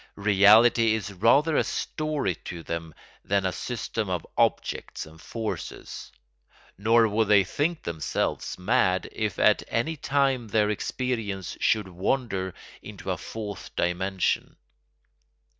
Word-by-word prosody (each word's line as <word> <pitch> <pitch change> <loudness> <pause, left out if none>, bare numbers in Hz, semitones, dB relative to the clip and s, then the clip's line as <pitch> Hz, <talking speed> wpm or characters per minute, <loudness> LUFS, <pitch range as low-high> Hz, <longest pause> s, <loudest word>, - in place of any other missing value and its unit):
Reality 110 +3 +5
is 100 -2 -5
rather 140 - +3
a - - +4
story 155 - -2
to 85 -2 -6
them 80 -1 -5 0.3
than 100 -1 0
a 95 - +1
system 110 -2 -4
of 90 -3 -2
objects - - 0
and 80 +1 -15
forces, 115 -2 -6 0.6
nor 115 +3 +4
would 110 +1 +1
they 100 -1 +6
think 155 - -1
themselves 80 -3 -2
mad 90 0 +2
if 105 -4 -2
at - - +4
any 140 +8 -1
time 135 -4 +1
their 105 0 +2
experience 105 -4 -3
should 105 -3 +2
wander 95 0 -2 0.3
into - - -6
a - - 0
fourth 105 -3 -7
dimension. 95 +2 0
105 Hz, 125 wpm, -26 LUFS, 95-120 Hz, 0.6 s, they